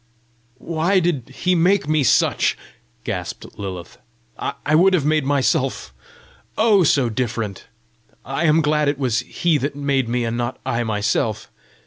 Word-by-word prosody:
"Why 170 +6 +1
did 165 -9 -1
he 180 +7 -1
make 180 -1 +2
me 155 -1 +2
such?" 125 - +2 0.5
gasped - - -5
Lilith. 95 -4 -7 0.4
"I 145 - -3
would 185 +4 +5
have 150 -6 0
made 155 -2 +2
myself 135 - 0 0.6
oh, 215 -4 +4
so 140 -5 +3
different! 110 -3 -3 0.6
I 135 +6 -2
am 155 +1 +4
glad 150 0 +1
it 145 0 0
was 125 -5 0
he 165 -4 0
that 140 +1 -3
made 140 -4 0
me 120 0 0
and 115 0 -2
not 120 +1 -3
I 115 +1 -1
myself! 110 +1 -1
140 Hz, 145 wpm, -21 LUFS, 120-160 Hz, 0.6 s, would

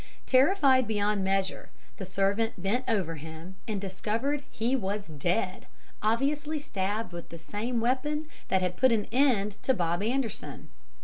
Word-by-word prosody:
"Terrified 265 -2 +5
beyond 205 -2 +1
measure, 190 0 0 0.3
the 190 - -6
servant 200 +3 +1
bent 215 +8 0
over 185 -8 0
him 160 +5 -9
and 210 -3 -1
discovered 225 +9 -1
he 240 +4 0
was 200 -3 -2
dead, 175 +5 -1 0.3
obviously 285 +8 +1
stabbed 205 -6 -2
with 170 -1 -7
the 170 - -8
same 210 +8 -3
weapon 290 +6 0 0.2
that 190 -1 +2
had 180 0 -1
put 260 -1 +5
an 220 -3 +2
end 225 -7 +2
to 260 - +2
Bob 175 -1 0
Anderson. 235 +1 -2
210 Hz, 145 wpm, -29 LUFS, 190-255 Hz, 0.3 s, Terrified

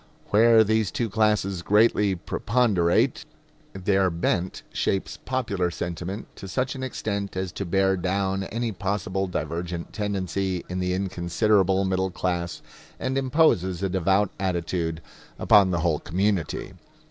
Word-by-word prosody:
Where 115 +1 +6
these 110 -1 +1
two 115 0 -2
classes 105 -4 +1
greatly 105 0 +3
preponderate, 100 -2 +1 0.5
their 95 0 +2
bent 85 +1 -1
shapes 95 - -1
popular 105 -9 -1
sentiment 85 +4 -5
to 95 - -8
such 130 +7 -1
an 135 - -7
extent 100 -6 -3
as 95 -1 -2
to 100 - -5
bear 95 +2 +2
down 95 +1 -1
any 115 +2 -2
possible 95 -1 -2
divergent 85 0 -4
tendency 95 -3 -2
in 90 +1 -4
the 90 0 0
inconsiderable 95 +1 +1
middle 95 0 0
class, 85 -2 -3 0.4
and 130 - -2
imposes 130 - +2
a 95 - +1
devout 95 +2 +2
attitude 85 -3 -2 0.3
upon 100 -2 +5
the 85 -2 0
whole 80 -3 +1
community. 95 -1 -1
95 Hz, 130 wpm, -25 LUFS, 90-105 Hz, 0.5 s, Where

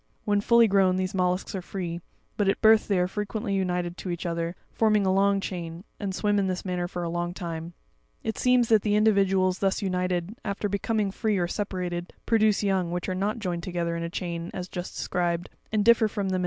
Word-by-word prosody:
When 205 -1 +2
full 235 +2 +6
grown, 190 -2 +3
these 185 0 -1
mollusks 180 0 0
are 190 - -3
free; 175 -2 -5 0.3
but 205 -3 +2
at - - +1
birth 220 0 +5
they 200 - +2
are 180 0 +2
fre 210 +3 -3
quently 210 -1 -3
united 180 -2 -1
to 185 - -6
each 175 +1 -4
other, 170 0 -2 0.2
forming 215 -3 +3
a 190 - +3
long 200 +1 +3
chain, 170 -2 -5 0.2
and 195 -3 -3
swim 205 0 +1
in 195 - +1
this 185 +1 -3
manner 180 -1 -1
for 175 0 -5
a - - -2
long 175 +1 -2
time; 170 -2 -5 0.5
it 220 - -2
seems 250 -2 +3
that 220 -2 +5
the 205 0 +1
individuals 195 -3 +3
thus 195 +1 0
united, 180 +1 -1
after 200 0 -2
becoming 200 0 0
free 215 0 0
or 175 -1 +1
separated, 180 -3 -3
produce 215 -2 +3
young, 190 -3 +1
which 175 +1 -3
are - - 0
not 200 +5 -1
joined 180 -6 -3
together 170 -1 -2
in 170 - -3
a 170 - -3
chain 170 -1 -4
as 180 -1 -4
just 180 -1 -6
described, 175 -1 -1 0.2
and 210 -1 +1
differ 230 -1 +6
from 205 -2 -2
them. 185 -1 0
190 Hz, 220 wpm, -27 LUFS, 175-205 Hz, 0.5 s, full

